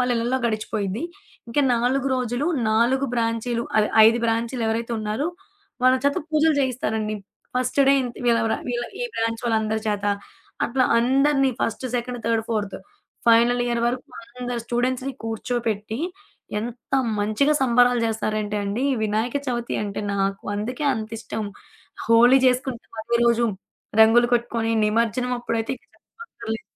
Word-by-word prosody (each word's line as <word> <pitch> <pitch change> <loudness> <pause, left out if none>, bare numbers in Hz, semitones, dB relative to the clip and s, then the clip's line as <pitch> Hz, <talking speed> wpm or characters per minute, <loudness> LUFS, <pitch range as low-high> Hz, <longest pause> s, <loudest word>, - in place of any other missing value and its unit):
వాళ్ళ 250 0 +2
ఇళ్లలో 240 +3 0
గడిచిపోయిద్ది. 215 0 -2 0.5
ఇంకా 230 +5 +1
4 255 +3 +1
రోజులు, 250 +3 -1 0.2
4 240 +5 +2
బ్రాంచీలు 230 0 -1 0.2
ఐ - - +4 0.2
ఐదు 230 +2 +4
బ్రాంచీలు 230 +2 -1
ఎవరైతే 230 +1 -2
ఉన్నారో, 215 +7 -2 0.6
వాళ్ళ 255 0 +6
చేత 285 0 +2
పూజలు 310 0 +3
చేయిస్తారండి. 220 -5 -1 0.4
ఫస్ట్ 255 +2 -1
డే - - +7
ఇంత 245 -2 -5
వీళ్ళ 235 -1 +4
వర 220 - +1
వీళ్ళ 240 0 -1 0.2
ఈ - - 0
బ్రాంచ్ 230 +1 -1
వాళ్ళందరి 220 -1 0
చేత, 205 -1 -1 0.6
అట్లా 255 +1 +1
అందరిని 270 +2 +3
first, 230 +3 -2
second, 245 0 -4
third, 230 -1 +1
fourth 205 -4 -2 0.5
final 235 +1 +5
year 240 -1 0
వరకు 250 +1 -2 0.4
అందరు 245 -1 -3
స్టూడెంట్స్‌ని 255 +2 -1
కూర్చోపెట్టి, 225 -1 -2 0.6
ఎంత 240 +3 -8 0.3
మంచిగా 215 +9 +2
సంబరాలు 245 -1 +4
చేస్తారంటే 215 -1 -2
అండి. 210 +7 -1 0.2
వినాయక 220 +5 0
చవితి 240 -1 -2
అంటే 200 -1 -4
నాకు 195 0 -1
అందుకే 245 +8 -3
అంతిష్టం. 220 -1 -5 0.6
హోలీ 235 +3 +6
చేసుకుంటాం 250 -1 -1
అదే 235 +1 0
రోజు. 235 0 +3 0.5
రంగులు 230 +2 +6
కొట్టుకొని 230 -1 0
నిమజ్జనమప్పుడైతే 230 +1 -1
ఇక - - -27
చెప్పక్కర్లేదు. 230 - -8
235 Hz, 130 wpm, -23 LUFS, 220-250 Hz, 0.6 s, డే